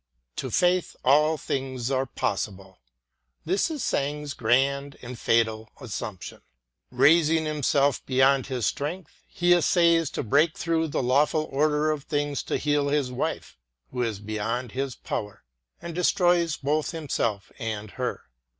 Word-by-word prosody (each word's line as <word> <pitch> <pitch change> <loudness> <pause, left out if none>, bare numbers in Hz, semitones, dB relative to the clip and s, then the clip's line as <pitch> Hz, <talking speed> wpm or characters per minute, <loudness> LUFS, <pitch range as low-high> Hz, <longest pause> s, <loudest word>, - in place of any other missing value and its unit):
To 130 - -3
faith 180 - +1
all 150 +4 +4
things 130 -3 -3
are 135 0 0
possible. 95 -4 -4 0.7
This 190 - +1
is 305 -5 -4
Sang 145 +2 -1
's 145 - -4
grand 140 +4 +1
and 125 +1 -7
fatal 110 -1 +1
assumption. 105 -7 -6 0.5
Eaising 155 +5 +4
himself 145 -2 +1
be 130 - -3
yond 135 +1 +4
his 125 -5 -2
strength, 155 - -4
he 175 0 +2
essays 170 -2 +3
to - - -2
break 145 +8 +2
through 165 -1 0
the 140 - -2
lawful 150 +5 +2
order 150 +2 +2
of 150 -2 -4
things 145 -1 -1
to - - -1
heal 145 -1 +1
his 140 -3 0
wife, 125 - -4 0.3
who 125 - -3
is 115 -4 -1
beyond 110 +3 -3
his 135 -1 -3
power 105 -1 -5
ŌĆö - - -57
and 170 - -5
destroys 175 -1 +2
both 150 +1 0
himself 125 - -2
and 110 -3 -4
her. - - -4
140 Hz, 150 wpm, -26 LUFS, 120-155 Hz, 0.7 s, all